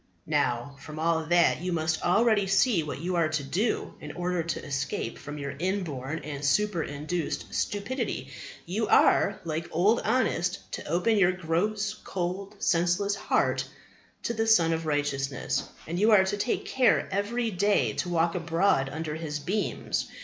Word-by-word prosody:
Now, 125 +3 0
from 155 +2 -9
all 160 0 +1
that, 175 -1 +3
you 180 0 -2
must 160 -1 0
already 210 +2 +3
see 195 0 +3
what 150 -3 -5
you 180 +2 -1
are 165 -2 +2
to 155 -2 -1
do 180 - -1
in 150 - -7
order 180 0 -1
to 165 -1 -4
escape 135 -4 -3
from 145 +1 -7
your 140 -1 -4
inborn 165 -6 -2
and 145 -1 -6
superinduced 165 -2 -1
stupidity. 205 - -2 0.3
You 210 +5 -1
are, 200 0 +4
like 160 0 -3
Old 200 +8 +3
Honest, 200 -6 0
to - - -5
open 210 +6 +2
your 185 -2 +4
gross, 200 +5 -1
cold, 195 0 -4
senseless 175 +3 +1
heart - - 0 0.6
to 235 - -1
the 225 0 -1
Sun 170 -7 +5
of 160 0 -3
Righteousness, 140 -2 -1 0.2
and 170 +2 -3
you 215 +3 +4
are 210 -4 +7
to 190 +2 -1
take 205 +4 -1
care 260 -2 +3
every 225 +4 -1
day 205 +2 +2
to 180 - -2
walk 170 -1 +2
abroad 165 -5 +1
under 155 0 -4
His 155 -2 -4
beams. 190 +8 -2
175 Hz, 160 wpm, -28 LUFS, 155-200 Hz, 0.6 s, are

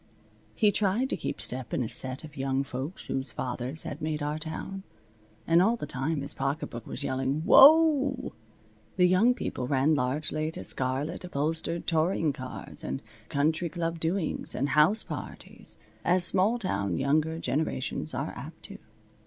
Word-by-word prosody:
He 210 -2 +4
tried 210 +6 0
to - - +1
keep - - -5
step 125 0 -1
in - - 0
a - - -3
set 130 +5 +2
of 150 -2 -11
young 135 0 -1
folks 135 +6 -6
whose 135 +1 -3
fathers 130 +4 -1
had 145 - -7
made 155 -1 -2
our 150 +1 -2
town. 160 +5 -5 0.6
And 165 +1 +4
all 225 +5 +3
the 235 - -6
time 140 +3 -2
his 140 - -1
pocketbook 135 -4 -4
was - - -6
yelling, 135 +2 -1
"Whoa!" 285 -3 +6 0.6
The 180 -1 +5
young 210 +8 +4
people 125 - -4
ran 140 +3 +2
largely 155 +3 -1
to 160 - -5
scarlet 135 +7 -2
upholstered 165 +1 -2
touring 160 -2 +1
cars, 130 -1 -7
and 65 - -4 0.3
country 160 +4 0
club 165 +1 -3
doings, 165 +1 -2
and 140 +3 -1
house 165 +10 +4
parties, - - -6 0.3
as 180 0 +4
small 195 +6 +5
town 100 - -2
younger 155 +4 +1
generations 155 -1 -2
are - - -3
apt - - -10
to. - - -11
155 Hz, 160 wpm, -28 LUFS, 135-180 Hz, 0.6 s, Whoa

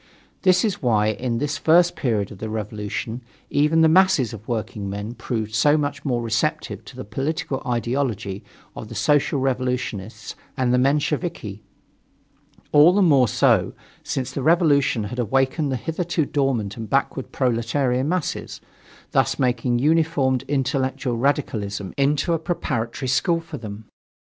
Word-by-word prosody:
This 185 +1 +4
is 210 - -2
why 110 -5 +2
in 120 +2 -2
this 145 +2 -2
first 170 +2 +4
period 110 -7 -1
of 100 - -11
the 110 - -4
revolution 110 +2 -4 0.3
even 150 +3 +3
the 160 - +6
masses 160 - +4
of 110 0 -10
workingmen 105 -2 -4
proved 110 -3 -4
so 145 +7 +4
much 145 -1 -2
more 120 -4 -1
receptive 110 -1 -1
to - - -12
the - - -7
political 135 +5 -3
ideology 115 -4 -2 0.3
of 110 - -7
the 115 - -8
Social 140 +6 +2
Revolutionists 125 -5 -3 0.2
and 125 -1 +1
the 125 - +4
Mensheviki. 140 - -1 1.1
All 150 +4 +7
the 200 +1 +4
more 140 -7 +5
so, - - +2 0.3
since 130 -2 -3
the 140 - -4
revolution 145 - +3
had 120 +5 -5
awakened 135 +5 +1
the - - 0
hitherto 165 +4 -1
dormant 125 -9 -1
and 110 -2 -6
backward 135 0 -1
proletarian 125 +2 0
masses, 180 -3 -3 0.5
thus - - +2
making 125 -1 +1
uninformed 145 -3 +2
intellectual 135 -2 -1
radicalism 110 -7 -1
into 145 +4 +1
a 165 - 0
preparatory 130 -7 -3
school 165 +6 +2
for 165 0 -8
them. 105 -1 -8
130 Hz, 145 wpm, -22 LUFS, 115-150 Hz, 1.1 s, All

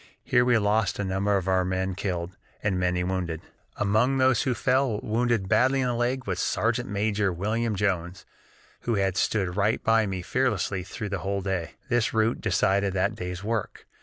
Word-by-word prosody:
Here 125 -1 +3
we 125 -1 +4
lost 105 0 +1
a 100 - -2
number 100 +1 +1
of 95 -1 -3
our 95 -1 +3
men 95 +1 -1
killed, 90 -2 -3 0.3
and 95 -3 0
many 90 0 +1
wounded. 90 -3 -2 0.4
"Among 110 +7 +2
those 130 -3 +3
who 130 -4 0
fell, 130 -2 +1
wounded 115 -2 0
badly 130 +7 +3
in 130 - +1
the 125 - 0
leg, 125 +2 -1
was 90 -2 -2
Sergeant 120 +2 0
Major 105 -1 0
William 110 +5 -1
Jones, 95 -2 -2 0.5
who 120 - -1
had 95 -2 +1
stood 95 -4 0
right 105 +2 +1
by 115 -1 +3
me 95 -2 -4
fearlessly 125 -5 0
through 100 +4 -6
the 95 -1 -2
whole 100 +1 -2
day. 95 -3 -3
This 120 -3 +1
rout 110 +1 +1
decided 100 0 +1
that 95 -1 +1
day's 90 +1 -6
work. 110 0 -3
100 Hz, 185 wpm, -26 LUFS, 95-115 Hz, 0.5 s, we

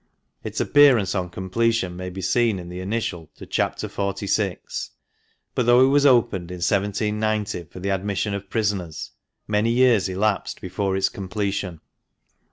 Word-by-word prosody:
Its - - -4
appearance 130 -10 +5
on 90 -2 -2
completion 95 +1 0
may 90 +1 -5
be 95 +1 -7
seen 115 +2 +2
in 90 -1 -8
the 90 +1 -6
initial 95 -5 -3
to - - -10
Chapter - - -1
XLVI. 100 -1 -2 0.6
But 120 - 0
though 120 +2 +7
it - - +3
was 145 +1 +5
opened 110 -9 +3
in 90 - -5
1790 105 +1 -1
for 85 - -11
the 100 +2 -3
admission 100 +2 -1
of 100 -1 -5
prisoners, 100 -8 -2 0.4
many 105 +2 +1
years 120 -5 +4
elapsed 100 +2 -1
before 95 +1 -2
its 95 - +2
completion. 95 -3 -3
100 Hz, 150 wpm, -23 LUFS, 95-110 Hz, 0.6 s, though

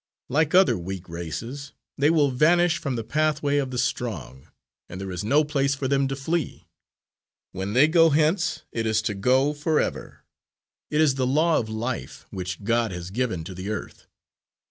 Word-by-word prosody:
Like 155 +5 +1
other 185 - +5
weak 95 +1 -6
races, 115 - -6 0.2
they 145 +2 +3
will 150 -4 +3
vanish 170 +5 +3
from 135 -3 -3
the 115 - -3
pathway 150 +1 0
of 135 -2 0
the 125 - -5
strong, 100 - -3 0.4
and 90 - -7
there 95 -1 -5
is 90 +2 -4
no 140 +8 +3
place 140 -2 0
for 135 -1 -3
them 135 0 +2
to 135 - -3
flee. 155 +3 -3 0.9
When 95 +2 -4
they 135 +6 +6
go 165 0 +5
hence, 155 +5 +1
it 115 -1 -2
is 110 -1 +1
to 110 - -1
go 130 +8 +2
forever. 150 +1 -2 0.7
It 150 - +2
is 150 -4 +4
the 130 - +2
law 155 +5 +3
of 110 - -4
life, 110 - -4
which 90 +1 -5
God 115 0 +1
has 90 0 -6
given 110 -7 -2
to 95 - -8
the 95 +3 -6
earth. 110 - -6
130 Hz, 180 wpm, -25 LUFS, 105-150 Hz, 0.9 s, they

